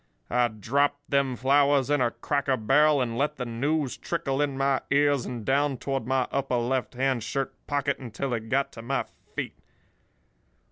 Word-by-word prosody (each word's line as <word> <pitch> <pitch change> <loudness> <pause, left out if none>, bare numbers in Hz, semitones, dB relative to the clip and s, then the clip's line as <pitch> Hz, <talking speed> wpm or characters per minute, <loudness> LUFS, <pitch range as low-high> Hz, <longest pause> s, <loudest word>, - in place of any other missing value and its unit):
"I 125 0 +3
dropped 140 +7 -1
them 140 -2 +2
flowers 140 +2 +3
in 145 -2 +3
a 120 - +3
cracker 135 +3 -1
barrel, 145 +6 +4
and 115 -2 -2
let 150 +1 +1
the 125 - -4
news 135 +4 -1
trickle 145 -5 -2
in 140 -2 0
my 135 -1 +2
ears 145 -2 +3
and 120 -4 -5
down 140 0 +2
toward 135 -2 -3
my 130 -1 +1
upper 135 -2 0
left 125 +2 -1
hand 130 -1 +1
shirt 135 +5 -2
pocket 140 -1 0
until 125 +1 -4
it 110 -1 -4
got 135 +3 +1
to 115 - -9
my 135 +4 -1 0.3
feet. - - -4
135 Hz, 175 wpm, -27 LUFS, 125-140 Hz, 0.3 s, barrel